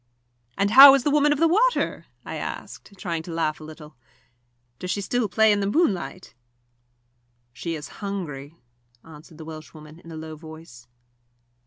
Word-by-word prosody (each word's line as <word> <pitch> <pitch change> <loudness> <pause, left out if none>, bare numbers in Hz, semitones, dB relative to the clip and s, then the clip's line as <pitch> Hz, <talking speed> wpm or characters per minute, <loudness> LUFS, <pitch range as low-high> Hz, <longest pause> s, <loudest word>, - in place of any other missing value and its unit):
"And 200 +1 +1
how 275 +3 +11
is 270 - -1
the 290 - +1
Woman 295 0 +3
of 295 - +1
the 330 +3 +3
Water?" 460 +9 +1 0.2
I - - -6
asked, 200 - -8
trying 170 -3 -3
to 170 - -9
laugh 160 -2 -2
a - - -11
little. 155 -2 -12 0.8
"Does 180 - -6
she 200 - -1
still 220 +2 -1
play 220 +4 +4
in 205 - +2
the 200 - -1
moonlight?" 200 - -1 1.2
"She 165 +6 -5
is 150 -2 -7
hungry," 165 -8 -6 0.5
answered 160 0 -15
the 160 - -10
Welshwoman, 155 0 -11
in 165 -1 -13
a - - -8
low 155 0 -8
voice. 155 -6 -13
170 Hz, 165 wpm, -24 LUFS, 155-215 Hz, 1.2 s, how